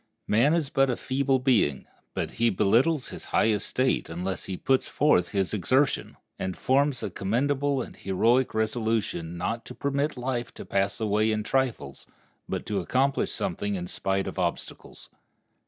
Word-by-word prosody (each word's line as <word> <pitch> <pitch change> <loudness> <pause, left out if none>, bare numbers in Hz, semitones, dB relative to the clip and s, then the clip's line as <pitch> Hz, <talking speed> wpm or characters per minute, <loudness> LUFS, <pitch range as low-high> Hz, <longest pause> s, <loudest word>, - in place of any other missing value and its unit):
Man 130 +9 +3
is 155 -5 0
but 135 -4 +3
a 125 - 0
feeble 135 0 +1
being, 120 - +2 0.3
but - - -2
he 115 +1 +2
belittles 120 - +2
his - - -7
high - - +2
estate 120 +5 0
unless 90 +2 -3
he 95 - -4
puts 130 +6 +1
forth 115 - +3
his 95 -2 -1
exertion, 130 +8 +1 0.2
and 95 -1 -3
forms 140 0 +1
a 100 - -3
commendable 135 +8 0
and - - -11
heroic 115 +7 +1
resolution 110 -6 -1
not 115 +6 -2
to - - -9
permit 140 +1 -1
life 125 -1 -2
to - - -8
pass 100 +1 0
away 110 0 +2
in 110 0 -1
trifles, 115 - -2 0.4
but - - -3
to 105 -2 -1
accomplish 130 +9 +1
something 105 0 -2
in 90 -2 -4
spite 95 +2 -1
of - - -5
obstacles. 85 -2 -4
115 Hz, 160 wpm, -27 LUFS, 95-135 Hz, 0.4 s, Man